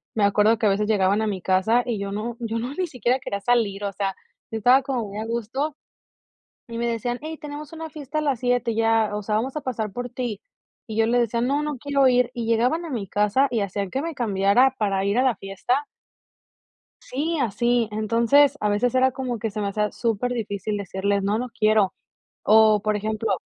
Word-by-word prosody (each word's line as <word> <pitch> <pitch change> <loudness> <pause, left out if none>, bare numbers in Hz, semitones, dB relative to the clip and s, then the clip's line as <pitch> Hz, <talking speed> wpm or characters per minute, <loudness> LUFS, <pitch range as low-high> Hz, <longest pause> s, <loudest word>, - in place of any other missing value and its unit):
me 215 - +1
acuerdo 210 +3 +3
que - - 0
a - - +5
veces 205 +2 +1
llegaban 200 0 +2
a 220 - 0
mi 195 -3 -3
casa, 190 +7 +2
y 235 -4 -2
yo 200 0 -4
no 220 +3 -4
yo 230 -1 -3
no 245 +4 -4
ni 365 +1 -1
siquiera 250 - 0
quería 200 -6 -4
salir, 210 -4 +1
o 200 - -2
sea, 195 -1 -2 0.4
yo 225 - -2
estaba 250 +5 +5
como 260 -4 -2
muy 205 +2 -6
a 220 - -3
gusto. 235 +6 -3 0.9
Y 230 0 -6
me 235 - -1
decían: 240 +1 -2
"Hey, 315 0 -6
tenemos 295 0 -8
una 320 0 -6
fiesta 300 0 -5
a - - -3
las 275 -5 0
7, 245 -2 +1
y - - -6
ya, 225 -1 +2
o 210 - -4
sea, 210 +1 -1
vamos 255 +6 -2
a - - -1
pasar 225 -6 -3
por 245 +3 -5
ti", 245 -2 -4 0.5
y 220 - -5
yo 225 - +4
le 245 +2 +2
decía: 235 0 0
"No, 280 +4 +1
no 300 -3 -3
quiero 280 +1 +2
ir", 250 -1 +3
y 235 -2 -3
llegaban 245 +9 +1
a 330 - -6
mi 220 -7 -4
casa, 210 +8 +2
y 235 -3 0
hacían 200 -1 -3
que 270 - -2
me 330 0 -4
cambiara 225 +2 +3
para 195 -2 0
ir 200 +4 +1
a - - +4
la 255 -3 +2
fiesta. 195 +9 -2 1.2
Sí, 310 +6 -2
así, 240 0 +1
entonces, 235 +7 +3
a 210 - +1
veces 225 +4 +1
era 260 0 +4
como 255 -2 -3
que 225 0 -3
se 215 +1 -5
me 200 - -1
hacía 210 +1 -1
súper 235 +1 -1
difícil 210 -2 -3
decirles: 200 +1 -1
"No, 205 +2 0
no 250 +1 -4
quiero". 215 -3 +2 0.5
O, 215 0 +5
por 215 0 +1
ejemplo 215 0 -1
230 Hz, 225 wpm, -24 LUFS, 210-255 Hz, 1.2 s, a